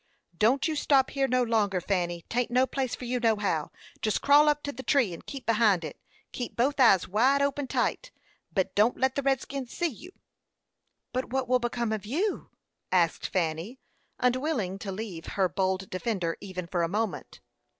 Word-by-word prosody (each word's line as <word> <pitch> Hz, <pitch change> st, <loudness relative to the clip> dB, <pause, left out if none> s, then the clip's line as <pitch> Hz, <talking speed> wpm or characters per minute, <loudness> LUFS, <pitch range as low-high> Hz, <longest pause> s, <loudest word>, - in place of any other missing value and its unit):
"Don't 235 Hz, -, +3 dB
you 315 Hz, -, -1 dB
stop 275 Hz, -2 st, +3 dB
here 275 Hz, -1 st, +1 dB
no 255 Hz, -1 st, +2 dB
longer, 210 Hz, -5 st, +1 dB
Fanny; 175 Hz, -2 st, -2 dB
'taint 245 Hz, +1 st, -1 dB
no 250 Hz, +2 st, +3 dB
place 260 Hz, -2 st, -2 dB
for 250 Hz, -, -8 dB
you, 250 Hz, +1 st, -1 dB
nohow. 205 Hz, -9 st, +1 dB, 0.3 s
Jest 215 Hz, -, +1 dB
crawl 290 Hz, +2 st, +6 dB
up 295 Hz, 0 st, 0 dB
to 285 Hz, -, -3 dB
the 265 Hz, -, -8 dB
tree, 260 Hz, -, +2 dB
and 165 Hz, -, -9 dB
keep 270 Hz, -3 st, -7 dB
behind 210 Hz, -6 st, +3 dB
it. 150 Hz, -, -8 dB, 0.3 s
Keep 245 Hz, -, -5 dB
both 275 Hz, +4 st, +1 dB
eyes 195 Hz, -8 st, +5 dB
wide 260 Hz, +8 st, +3 dB
open 280 Hz, 0 st, -1 dB
tight, -, -, -1 dB, 0.4 s
but 190 Hz, -2 st, 0 dB
don't 215 Hz, +4 st, +3 dB
let 265 Hz, 0 st, +2 dB
the 280 Hz, -, -1 dB
redskins 270 Hz, -1 st, -2 dB
see 345 Hz, -, -2 dB
you." 325 Hz, -, -5 dB, 1.0 s
"But 255 Hz, +1 st, -2 dB
what 260 Hz, 0 st, -1 dB
will 255 Hz, +1 st, +3 dB
become 240 Hz, -1 st, -2 dB
of 215 Hz, -3 st, -2 dB
you?" 365 Hz, -, -1 dB, 0.4 s
asked 170 Hz, -3 st, +2 dB
Fanny, 175 Hz, +7 st, -2 dB, 0.4 s
unwilling 250 Hz, -, 0 dB
to 200 Hz, -1 st, -5 dB
leave 190 Hz, -5 st, -6 dB
her 190 Hz, -2 st, +4 dB
bold 190 Hz, +2 st, -1 dB
defender 185 Hz, -4 st, -2 dB
even 185 Hz, -2 st, -6 dB
for 175 Hz, +1 st, -2 dB
a 170 Hz, -, +2 dB
moment. 215 Hz, +4 st, -3 dB
235 Hz, 180 wpm, -28 LUFS, 190-265 Hz, 1.0 s, crawl